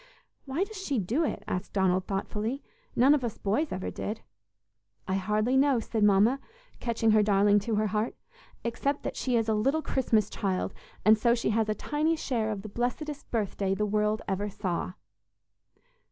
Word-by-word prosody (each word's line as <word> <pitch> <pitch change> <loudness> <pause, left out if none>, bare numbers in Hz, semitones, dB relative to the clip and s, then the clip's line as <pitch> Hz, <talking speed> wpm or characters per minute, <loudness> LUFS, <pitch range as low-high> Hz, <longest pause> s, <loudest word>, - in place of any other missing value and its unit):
"Why 280 +7 0
does 435 +1 -7
she 280 -7 -1
do 230 - +1
it?" 305 - -2
asked 180 +2 -3
Donald, 190 -1 +2
thoughtfully; 210 +6 -2 0.3
"None 265 +4 +6
of 290 -3 +1
us 235 -3 -3
boys 230 +10 0
ever 185 - -3
did." 220 +2 -4 0.9
"I 190 - -1
hardly 210 +6 +1
know," 270 -2 +4
said 225 -1 -1
Mama, 210 +6 +5 0.4
catching 230 -2 +1
her 215 0 +5
darling 205 0 +4
to 215 +2 -2
her 215 +1 +2
heart, 215 +2 -1 0.5
"except 275 +5 -1
that - - -3
she 250 -2 0
is 225 -1 +1
a 220 - +2
little 270 +9 +1
Christmas 225 -7 +1
child, 190 -3 -1 0.3
and 215 +1 +6
so 235 +1 +4
she 230 -2 0
has 220 0 +1
a 215 - +1
tiny 310 +6 0
share 240 -8 -1
of 205 -2 -4
the - - -6
blessedest 275 +7 -3
birthday 200 -3 -1
the 210 - 0
world 210 +1 0
ever 200 +1 -1
saw!" 185 -2 -3
220 Hz, 180 wpm, -28 LUFS, 205-255 Hz, 0.9 s, None